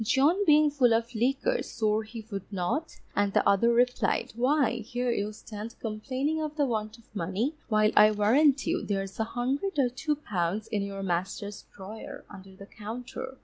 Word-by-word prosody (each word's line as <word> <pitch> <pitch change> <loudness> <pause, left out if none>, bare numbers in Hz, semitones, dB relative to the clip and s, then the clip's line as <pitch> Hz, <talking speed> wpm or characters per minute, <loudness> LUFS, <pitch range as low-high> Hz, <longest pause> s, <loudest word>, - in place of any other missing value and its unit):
John 290 - +3
being 300 -2 +5
full 250 -5 +4
of 230 +2 -2
liquor 275 - +1
swore 215 0 0
he 220 0 -9
would 200 0 -6
not, 200 - -2 0.2
and 205 0 +2
the - - +2
other 215 +4 +4
replied, 245 +1 +1
_Why, 255 -1 +2
here 245 +2 -1
you 210 -2 -1
stand 215 +1 -8
complaining 260 +8 -2
of 305 -1 -4
the 290 - +3
want 215 -2 -2
of 230 -2 -24
money, 200 - -1 0.2
while 215 -1 +4
I 210 0 +8
warrant 260 +7 +3
you, 340 +2 0
there's 195 -1 -3
a - - +3
hundred 270 - -2
or 265 -3 +3
two 300 +5 -1
pounds 205 - -2
in 210 - -1
your 195 0 -4
master's 195 +3 -3
drawer 205 +3 -9
under 190 -1 -12
the 200 - -11
counter. 240 +5 -7
225 Hz, 180 wpm, -28 LUFS, 205-270 Hz, 0.2 s, I